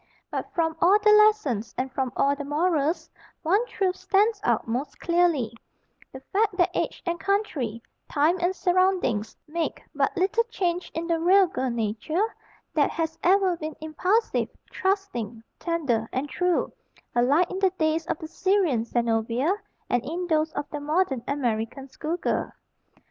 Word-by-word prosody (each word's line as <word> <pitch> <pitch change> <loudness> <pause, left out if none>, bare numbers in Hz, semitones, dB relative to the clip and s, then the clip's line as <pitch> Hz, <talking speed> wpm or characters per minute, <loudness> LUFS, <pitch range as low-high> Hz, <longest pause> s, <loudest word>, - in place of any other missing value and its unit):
But - - -4
from 325 -2 +1
all 380 +4 +6
the 425 0 +4
lessons 420 - +4
and 260 +1 -2
from 265 -2 -1
all 280 +1 +3
the 290 - -5
morals, 305 +1 0 0.4
one 390 +8 +3
truth 380 -5 0
stands 410 +2 +2
out - - +1
most 250 +6 -3
clearly 340 -10 +2 0.6
the 265 - -9
fact 410 -1 +2
that 350 - +3
age - - -2
and 345 -1 -1
country, 290 - -1 0.3
time 320 +5 +2
and 355 +2 +1
surroundings, 360 - +1
make 330 +2 -3
but - - 0
little 385 +6 +2
change 360 -6 -2
in 330 +1 -2
the 335 -1 0
real 375 +4 +6
girl 265 -7 -2
nature, 235 - -1 0.4
that 295 -3 +3
has 320 -1 -3
ever 375 0 +4
been 310 -1 -5
impulsive, 365 +8 0 0.2
trusting, 370 - -2 0.2
tender, 280 -10 -1
and 270 +3 -2
true, 360 +2 0 0.4
alike 280 +9 +3
in 375 - -3
the 385 -1 +4
days 320 -2 0
of - - -1
the 315 - -7
Syrian 355 - +1
Zenobia 235 - +1 0.3
and 245 -1 +1
in 335 +7 -3
those 315 -2 +1
of 290 - -3
the 295 - -3
modern 295 -4 0
American 250 -1 -2
school 310 +5 -4
girl. - - -1
325 Hz, 155 wpm, -26 LUFS, 265-370 Hz, 0.6 s, all